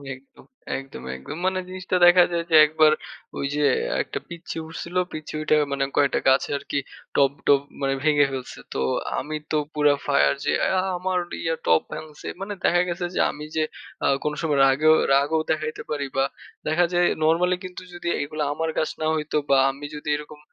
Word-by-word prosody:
একদম, 135 +1 -20 0.3
একদম, 135 - -9
একদম 145 - -8
মানে 185 0 +1
জিনিসটা 185 0 -3
দেখা 175 0 +8
যায় 170 -1 0
যে - - +5
১ 150 - -5
বার 155 0 +7 0.4
ঐযে 145 +2 -1 0.4
একটা - - -5
পিচ্চি 170 -1 -7
উঠছিল 170 +2 -8 0.2
পিচ্চি 155 -1 -7
উইঠা 155 0 +2 0.2
মানে 140 0 0
কয়টা 140 -2 +3
গাছে 135 +1 +4
আরকি 140 - -3 0.4
টব, 140 -1 +4 0.2
টব 140 -1 +6 0.2
মানে 135 0 +1
ভেঙে 150 -2 +4
ফেলছে। 130 -2 -6
তো - - -3 0.4
আমি 155 +3 -5 0.2
তো 155 - +2 0.2
পুরা 150 -1 +4
ফায়ার 70 -1 +3
যে - - +2
"অ্যা 185 - +2 0.2
আমার 185 0 -1 0.2
ইয়া 165 0 0
টব 80 0 +5
ভাঙছে।" 155 -1 -8
মানে 200 +1 -4
দেখা 175 +1 +4
গেছে 175 +1 -2
যে - - 0
আমি 150 +1 -8
যে 160 - +2 0.4
আ - - +4 0.2
কোন 150 - -1
সময় 150 -4 +1
রাগেও 155 +4 +5 0.2
রাগও 145 +4 +3
দেখাইতে 155 0 -2
পারি 145 -2 -2
বা 135 - +4 0.4
দেখা 155 +3 +3
যায় 175 0 +4 0.2
নরমালি 175 +3 +3
কিন্তু 180 0 -8
যদি 175 0 -7
এগুলা 150 +1 -3
আমার 160 +1 -2
গাছ 155 - 0
না - - 0
হইতো 150 -1 -2
বা 135 - +5
আমি 140 +2 -9
যদি 150 - -6
এরকম 150 0 -11
155 Hz, 185 wpm, -24 LUFS, 140-170 Hz, 0.4 s, দেখা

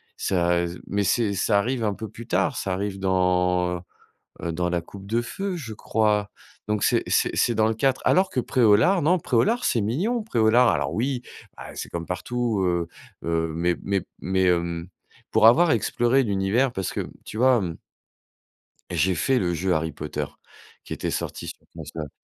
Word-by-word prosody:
ça 85 -1 +1
et 85 - -1 0.2
mais 100 +1 -1
c'est 105 +1 +1
ça 100 +2 +2
arrive 120 +3 0
un 105 -2 0
peu 110 - -6
plus 115 +3 -11
tard, 140 +1 +1
ça 95 - -3
arrive 100 0 -3
dans, 90 -1 +1
heu - - -8 0.6
heu, 85 - -1
dans 90 +2 -1
la 85 -1 0
coupe 95 +3 -12
de 115 +3 +1
feu, 195 +8 -4
je 120 -10 -6
crois? 105 -1 0 0.4
Donc 105 -1 0
c'est - - +3
c'est - - +1
c'est 120 - +2
dans 110 0 +3
le 110 - +1
4, 130 +3 +1
alors 185 +1 +4
que 130 - -1
Pré-au-Lard, 120 - +4
non, 175 +5 +3
Pré-au-Lard 205 - +1
c'est 115 - +2
mignon, 190 - 0
Pré-au-Lard. 120 - +3
Alors - - 0
oui, 125 +2 -1 0.3
bah, - - -8
c'est - - -6
comme 85 -1 -5
partout, 115 +2 -2
heu 85 -2 0 0.4
heu, 80 -1 0
mais 85 +1 +1
mais 100 -2 0 0.2
mais, 95 0 0
hem, 85 -1 0 0.4
pour 110 - +6
avoir 160 +7 +6
exploré 125 +2 +2
l'univers, 105 +4 +1
parce 95 -5 -3
que - - -3 0.2
tu 110 - -7
vois, 130 +1 +5
hem 85 -6 -3 1.1
j'ai 95 +1 +1
fait 130 +9 +1
le 85 -2 0
jeu 90 +3 0
Harry 80 0 -1
Potter - - -4 0.6
qui - - -8
était - - -3
sorti - - -4
sur - - -7 0.2
console. 75 -1 -7
105 Hz, 185 wpm, -24 LUFS, 90-120 Hz, 1.1 s, pour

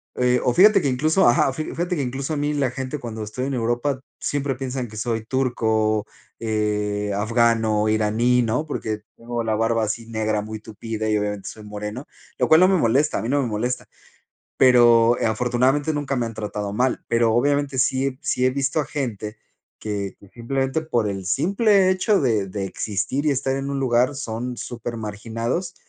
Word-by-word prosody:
eh 125 0 +2
o 125 - +2
fíjate 200 - +7
que 145 - 0
incluso 155 +8 +3
ajá. 120 +3 +4
Fi 155 - -3
fíjate 175 +2 -2
que 145 - -1
incluso 135 +4 -3
a 150 - -2
mí 145 +1 0
la 140 -3 +1
gente 130 +3 -5
cuando 110 -3 -6
estoy 125 +5 -4
en 140 - -2
Europa 120 +3 -1 0.2
siempre 140 -1 -1
piensan 130 -1 -4
que 110 - -11
soy 115 0 -2
turco, 110 -4 +1 0.3
eh, 105 -2 -1
afgano, 110 0 +2
iraní, 110 +3 +2
¿no? 125 +7 -1
Porque 110 -7 -3 0.2
tengo 120 0 -4
la 110 -1 0
barba 115 +1 +1
así 110 +2 -3
negra, 110 -2 -1
muy 110 0 -6
tupida 110 0 -5
y 105 - +2
obviamente 105 -1 -3
soy 110 - -11
moreno, 105 +5 -6 0.3
lo - - +1
cual 160 - +7
no 185 - +7
me 190 0 +3
molesta, 140 +2 +2
a - - -2
mí 115 - -3
no 140 +1 +2
me 130 - -1
molesta, 115 +3 -2 0.7
pero, 120 -2 +6
eh, 120 - -1
afortunadamente 125 +7 +1
nunca 145 -2 -2
me 120 -2 0
han 115 - -7
tratado 105 -1 -4
mal, 125 +3 0
pero 115 -1 +3
obviamente 140 +2 +1
sí 130 +1 +2
he 130 -1 -4
sí 125 - 0
he 130 - +4
visto 135 +3 -1
a - - -2
gente 115 -7 -4 0.4
que 100 -2 -4
que 100 - -16
simplemente 135 +6 -2
por 120 -9 0
el 95 -2 -4
simple 195 - +3
hecho 190 +2 +2
de 110 -8 +1
de 95 +1 -4
existir 110 +9 -2
y - - +4
estar 135 -1 0
en 135 0 -3
un 140 - -2
lugar 125 +1 +2
son 125 -2 -4
súper 120 0 -6
marginados, 115 - -3
120 Hz, 195 wpm, -23 LUFS, 110-135 Hz, 0.7 s, fíjate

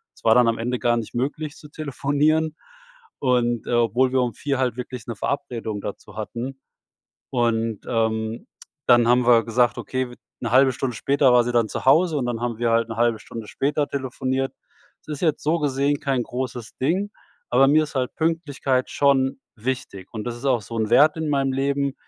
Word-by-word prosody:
es - - -22
war 110 - +5
dann 125 -1 +5
am 115 - +1
Ende 125 +2 -2
gar 120 0 +2
nicht 115 -2 -5
möglich 145 +4 -3
zu 150 - -13
telefonieren. 150 +2 0 0.6
Und, 120 -3 +1
äh, - - -3
obwohl 120 +2 +2
wir 130 - +3
um 120 -2 -1
4 140 +4 -2
halt 125 -2 0
wirklich 125 0 -7
’ne 115 - -3
Verabredung 115 -6 -3
dazu 105 - -8
hatten, 120 +5 -5 0.7
und, 115 -3 0
ähm, 110 -1 -1 0.4
dann 120 -1 +5
haben 125 0 +4
wir 115 -2 +6
gesagt: 120 +1 +2
„Okay, 130 -1 -2
w". - - -10 0.3
’Ne 115 -1 -3
1/2 130 0 +6
Stunde 125 -1 -3
später 140 +1 +3
war 120 -1 +5
sie 120 - -2
dann 115 -2 +2
zu - - -5
Hause 160 +4 +5
und 130 - -1
dann 120 -2 -2
haben 120 -2 -2
wir 120 -1 +1
halt 115 0 +2
'ne 115 - -6
1/2 115 -1 +2
Stunde 115 -2 -8
später 145 +1 -1
telefoniert. 130 0 -2 0.5
Das 155 - -4
ist - - -12
jetzt 160 -3 +1
so 160 +3 +1
gesehen 140 0 0
kein 135 -3 0
großes 125 -2 -5
Ding, 180 +10 0 0.4
aber 135 +2 +5
mir 155 +2 +4
ist 150 - -11
halt 125 -1 -1
Pünktlichkeit 145 -5 0
schon 135 -1 +2 0.2
wichtig. 110 -5 -4
Und 110 -2 -5
das 120 -1 -4
ist 125 - -12
auch 125 -4 +3
so 115 +4 -7
'n 110 -1 -1
Wert 150 +6 +6
in 160 -1 -2
meinem 135 -1 +1
Leben. 140 +1 0
125 Hz, 200 wpm, -23 LUFS, 115-140 Hz, 0.7 s, wir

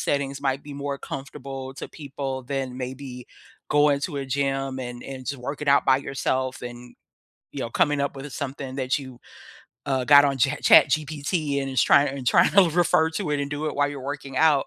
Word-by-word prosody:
settings 140 -1 -1
might 135 -1 -1
be 145 - -9
more 140 0 -4
comfortable 135 -1 -7
to - - -7
people 135 -3 -5
than 130 -1 -3
maybe 125 -1 -7 0.4
going 145 -1 +4
to 145 - -4
a 135 - -3
gym 135 0 -1
and 125 -1 -6
and 130 -2 -8
just 140 -3 -4
working 140 +4 -5
out 140 0 +5
by 130 - +5
yourself 130 -1 -2
and, 120 0 -9 0.6
you - - -5
know, 115 - -3
coming 145 +3 +2
up 140 0 -2
with, 135 +1 -7
uh, - - -10
something 135 -1 -5
that 130 0 0
you, 130 -3 -11 0.7
uh, 130 -2 0
got 145 +1 +8
on 140 -1 0
Chat 135 +3 +1
ChatGPT 150 -1 +3
and 135 - -4
is 130 -3 +2
trying 140 +1 +5
and 135 -2 -6
tryna 175 +6 +5
refer 170 -2 +4
to 160 -1 -3
it 145 -1 0
and 140 0 -3
do 145 +1 -3
it 150 - -2
while 145 0 +2
you're 145 -1 -6
working 140 -1 -6
out, 150 -3 +4
140 Hz, 205 wpm, -24 LUFS, 130-145 Hz, 0.7 s, got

